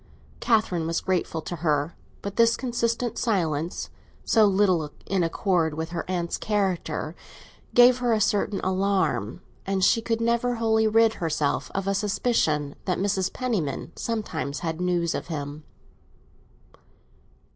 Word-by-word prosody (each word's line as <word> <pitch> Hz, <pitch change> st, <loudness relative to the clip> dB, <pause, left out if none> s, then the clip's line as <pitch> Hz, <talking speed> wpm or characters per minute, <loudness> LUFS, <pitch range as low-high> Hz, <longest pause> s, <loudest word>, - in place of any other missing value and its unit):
Catherine 200 Hz, -8 st, +1 dB
was 165 Hz, -, 0 dB
grateful 175 Hz, -4 st, -1 dB
to 175 Hz, -, -5 dB
her, 150 Hz, 0 st, 0 dB, 0.3 s
but 200 Hz, 0 st, -5 dB
this 230 Hz, 0 st, +4 dB
consistent 235 Hz, -1 st, -1 dB
silence, 170 Hz, -, -1 dB, 0.3 s
so 220 Hz, -2 st, +5 dB
little 190 Hz, -6 st, +2 dB, 0.2 s
in 195 Hz, -2 st, 0 dB
accord 165 Hz, -2 st, +1 dB
with 160 Hz, +1 st, -4 dB
her 175 Hz, +1 st, -5 dB
aunt's 175 Hz, -2 st, -1 dB
character, 185 Hz, -6 st, -1 dB, 0.6 s
gave 245 Hz, +1 st, +7 dB
her 245 Hz, -1 st, +1 dB
a 220 Hz, -, +3 dB
certain 205 Hz, 0 st, +1 dB
alarm, 185 Hz, -, 0 dB, 0.2 s
and 195 Hz, -1 st, -1 dB
she 230 Hz, -, +4 dB
could 225 Hz, 0 st, -1 dB
never 235 Hz, +1 st, +1 dB
wholly 220 Hz, -1 st, +2 dB
rid 225 Hz, +1 st, +4 dB
herself 155 Hz, -3 st, 0 dB
of 195 Hz, 0 st, -2 dB
a 195 Hz, -, +2 dB
suspicion 195 Hz, -8 st, 0 dB
that 180 Hz, -2 st, 0 dB
Mrs. 195 Hz, -1 st, 0 dB
Penniman 205 Hz, -, -2 dB
sometimes 205 Hz, -, -3 dB
had 165 Hz, 0 st, -3 dB
news 175 Hz, -2 st, +1 dB
of -, -, -4 dB
him. 150 Hz, -2 st, -5 dB
190 Hz, 135 wpm, -25 LUFS, 165-220 Hz, 0.6 s, gave